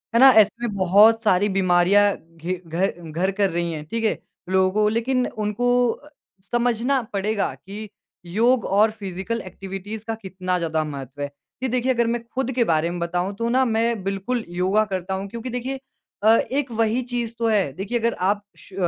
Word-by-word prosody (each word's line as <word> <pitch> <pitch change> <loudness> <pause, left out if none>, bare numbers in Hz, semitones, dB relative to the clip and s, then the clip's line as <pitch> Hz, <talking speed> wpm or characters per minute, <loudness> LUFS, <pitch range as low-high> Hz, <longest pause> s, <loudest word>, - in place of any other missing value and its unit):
है - - +5
ना, 270 +1 +9
ऐसे 220 -5 +6 0.2
में 210 - -5
बहुत 205 +5 +5
सारी 205 0 +3
बीमारियाँ 190 +2 +4
घे 165 +2 -6
घर 175 +5 0 0.2
घर 180 +5 0
कर 200 0 +1
रही 170 0 -2
हैं 150 -1 -5
ठीक 230 +8 -3
है। 220 - +1 0.3
लोगों 190 +3 +3
लेकिन 250 +3 +1
उनको 215 +3 -2 0.8
समझना 240 +2 +1
पड़ेगा 205 +1 -1
कि 210 +2 -9 0.4
योग 230 +7 +2
और 210 +3 +3
फ़िज़िकल 200 +2 -4
एक्टिविटीज़ 195 +3 -7
का 225 - -1
कितना 185 -2 -2
ज़्यादा 160 -2 -1
महत्त्व 140 -2 -7
है। 145 - -1 0.4
जी - - +2
देखिए, 255 +1 +1
अगर 235 -1 +1
मैं 235 0 -1
खुद 260 0 -1
के 245 -1 +2
बारे 165 -4 +1
में 175 - -4
बताऊँ 175 +3 -1
तो 230 +3 -2
ना 260 +2 +3
मैं 230 -2 0
बिल्कुल 195 +5 -2
योगा 185 +5 +1
करता 190 -2 -3
हूँ 190 +1 -3
क्योंकि 235 +3 -6
देखिए 250 +2 -4 0.4
अ, 215 - +5 0.2
एक 275 -1 -1
वही 225 +2 +1
चीज़ 240 -2 -3
तो 230 - +1
है। 205 -9 +2
देखिए 200 - -2
अगर 235 +1 +1
आप 200 +3 0
श - - -17
205 Hz, 185 wpm, -23 LUFS, 185-230 Hz, 0.8 s, ना